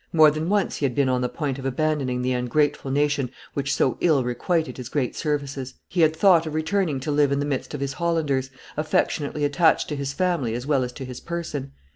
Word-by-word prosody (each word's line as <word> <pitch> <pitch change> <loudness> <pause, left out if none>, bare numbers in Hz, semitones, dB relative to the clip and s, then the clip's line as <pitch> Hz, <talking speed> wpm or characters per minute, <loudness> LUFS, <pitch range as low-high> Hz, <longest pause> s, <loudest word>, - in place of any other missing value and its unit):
More 155 -2 +7
than 155 +3 -3
once 205 -1 +1
he 145 - 0
had 125 -3 -1
been 140 -2 +2
on 125 -1 +1
the 125 - 0
point 140 -2 -3
of 135 - -7
abandonhig 135 -2 0
the 130 - 0
ungrateful 140 +3 0
nation 140 -1 +1 0.2
which 140 0 -1
so 130 - +1
ill 155 -6 +3
requited 155 +7 -1
his 125 -2 -7
great 130 -4 -1
services; 140 -3 -3
he 175 - 0
had 160 0 +4
thought 170 -2 +5
of 155 - -4
returning 160 -2 0
to 150 - -2
live 145 -1 +3
in 140 - +2
the 145 - 0
midst 145 +1 -3
of 140 - -6
his 140 -1 -2
Hollanders, 150 -5 0 0.3
affectionately 150 -1 0
attached 160 +3 +3
to 150 - -2
his 140 -1 -3
family 165 -8 0
as 120 +1 -4
well 140 -3 +2
as 125 - -4
to 135 - -7
his 125 -1 -7
person. 150 -5 -5
145 Hz, 225 wpm, -24 LUFS, 130-155 Hz, 0.3 s, More